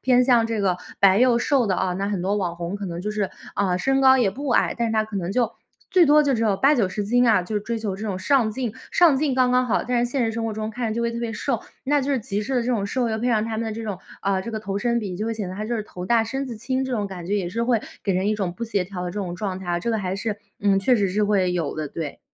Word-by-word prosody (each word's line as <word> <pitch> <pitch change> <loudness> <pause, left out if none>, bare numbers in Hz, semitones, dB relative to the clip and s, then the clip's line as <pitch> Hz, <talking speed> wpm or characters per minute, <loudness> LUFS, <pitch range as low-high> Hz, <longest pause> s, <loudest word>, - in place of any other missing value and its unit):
偏 250 -1 +4
向 240 -3 +4
这 225 -2 -2
个 190 -3 +1 0.2
白 195 0 +5
幼 245 -1 +4
瘦 255 0 +2
的 190 - +1
啊。 185 0 0
那 195 +2 -2
很 200 -4 -2
多 195 +3 0
网 175 -4 -2
红 170 +2 -4
可 200 -1 -5
能 170 -1 -5
就 210 - -2
是， 210 -2 -1 0.3
啊， 185 -3 +1
身 270 +8 +1
高 265 -1 +7
也 220 -6 +3
不 280 +8 -6
矮， - - +3
但 235 - +1
是 - - -2
她 215 0 +2
可 215 -1 -6
能 180 -2 -2
就 240 +1 +1 0.4
最 360 -4 +5
多 300 +1 +6
就 285 -2 +2
只 230 -3 0
有 210 -4 +2
80-90 220 -7 +2
斤 245 +4 +3
啊， 205 - +4
就 180 +5 -6
是 - - 0
追 230 +2 -3
求 210 -3 -3
这 215 +2 -5
种 190 -2 -2
上 235 +2 +2
镜。 235 0 -3 0.2
上 335 -6 +5
镜 275 -1 +1
刚 255 -1 +3
刚 250 0 +3
好， 230 - +1
但 240 -1 +1
是 240 - -3
现 260 -2 +1
实 225 - 0
生 230 0 -3
活 225 - -2
中 215 0 -4
看 235 +1 -3
着 215 - -2
就 235 - -1
会 235 - 0
特 235 - -5
别 235 -1 -3
瘦， 210 - -2 0.2
那 290 +2 +2
就 275 +1 -2
是 260 - 0
极 205 -1 -3
致 265 +5 -3
的 250 - +3
这 - - -5
种 215 -5 0
瘦， 245 +3 0
又 220 0 -1
配 240 - -1
上 220 -3 +2
他 225 - -4
们 230 - -1
的 220 - -3
这 225 +1 -5
种， 205 -4 -4 0.2
啊， 195 -1 0
这 230 - -6
个 220 - -3
头 200 -1 -3
身 235 +2 +1
比 195 -5 -5
就 215 - -3
会 230 - -1
显 210 -4 -4
得 185 - -7
她 215 - -3
就 235 +2 -2
是 215 - -2
头 180 -3 -8
大、 235 -1 +4
身 265 +5 -3
子 235 -3 -6
轻， 260 +4 -1
这 260 - -4
种 210 -4 -1
感 180 -3 -8
觉。 200 - 0
也 190 -4 -1
是 230 +6 -2
会 235 -2 +2 0.2
给 195 - +1
人 185 +2 0
一 215 - +2
种 190 -4 -2
不 180 - -9
协 205 -5 -1
调 180 -1 -6
的 180 - -3
这 - - -11
种 180 -3 -3
状 190 -1 -3
态 190 - -10
啊， 175 0 0
这 235 - -1
个 225 - 0
还 190 -2 -2
是， 205 +2 -3 0.2
嗯， 200 -1 +3
确 220 +6 +3
实 200 -2 +1
是 205 +3 +1
会 200 -3 +2
有 170 -4 -2
的， 155 -1 -4
对。 150 0 -6
215 Hz, 350 characters per minute, -23 LUFS, 195-240 Hz, 0.4 s, 高